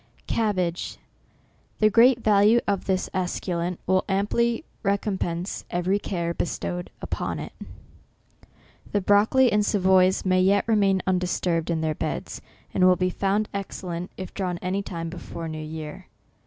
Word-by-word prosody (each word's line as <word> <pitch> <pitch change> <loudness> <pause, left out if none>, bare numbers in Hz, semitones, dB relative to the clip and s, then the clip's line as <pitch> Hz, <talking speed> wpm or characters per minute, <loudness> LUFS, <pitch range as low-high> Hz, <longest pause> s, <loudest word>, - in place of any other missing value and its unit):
CABBAGE. 185 -6 -1 0.8
The 215 0 +4
great 235 +3 +5
value 210 +2 +5
of 200 -2 0
this 190 -1 0
esculent 180 -1 -2
will 185 0 +2
amply 235 - +1 0.2
recompense 195 -3 -2
every 180 +3 0
care 170 -4 -2
bestowed 175 +1 -3
upon - - -3
it. - - -7 1.4
The 205 - +3
broccoli 215 +6 +4
and 210 0 +3
Savoys 190 -2 +3
may 185 0 +3
yet 195 +1 +4
remain 200 -4 +3
undisturbed 180 -2 0
in 165 -2 0
their 160 -1 0
beds, - - -4 0.3
and 185 - +2
will 185 - +6
be 185 0 0
found 200 +3 0
excellent 180 -3 -5
if 185 - -7
drawn 180 -3 -2
any 185 +3 -2
time 165 -4 -5
before 170 -1 -7
new 155 -1 -5
year. 155 +3 -7
185 Hz, 140 wpm, -25 LUFS, 175-205 Hz, 1.4 s, will